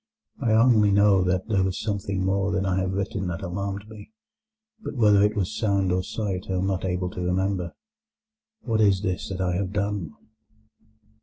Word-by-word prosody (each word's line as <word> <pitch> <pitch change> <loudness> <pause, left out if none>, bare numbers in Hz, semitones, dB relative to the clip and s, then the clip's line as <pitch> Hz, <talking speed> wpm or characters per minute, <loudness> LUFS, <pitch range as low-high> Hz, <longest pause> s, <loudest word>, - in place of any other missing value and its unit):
I 115 -4 +2
only 110 -2 +5
know 100 -1 +4
that 90 0 0
there 105 -4 +2
was 95 -1 -2
something 100 -3 -2
more 100 +1 +1
than 95 +1 0
I 95 0 +1
have 95 0 -1
written 100 -1 -2
that 90 +3 -4
alarmed 100 +3 -4
me, 105 -1 -12 0.7
but 220 - -6
whether 105 -4 +5
it 105 +1 +2
was 100 +1 -2
sound 100 -4 +1
or 90 +1 +1
sight 95 -1 -4
I - - -1
am 95 0 0
not 95 -1 -1
able 90 -1 -2
to 90 - -6
remember. 90 0 -1 0.9
What 110 -2 0
is 100 -2 +3
this 90 -2 -2
that 95 -1 -4
I 90 -1 0
have 95 0 -3
done?" 100 -6 -2
95 Hz, 185 wpm, -25 LUFS, 95-105 Hz, 0.9 s, only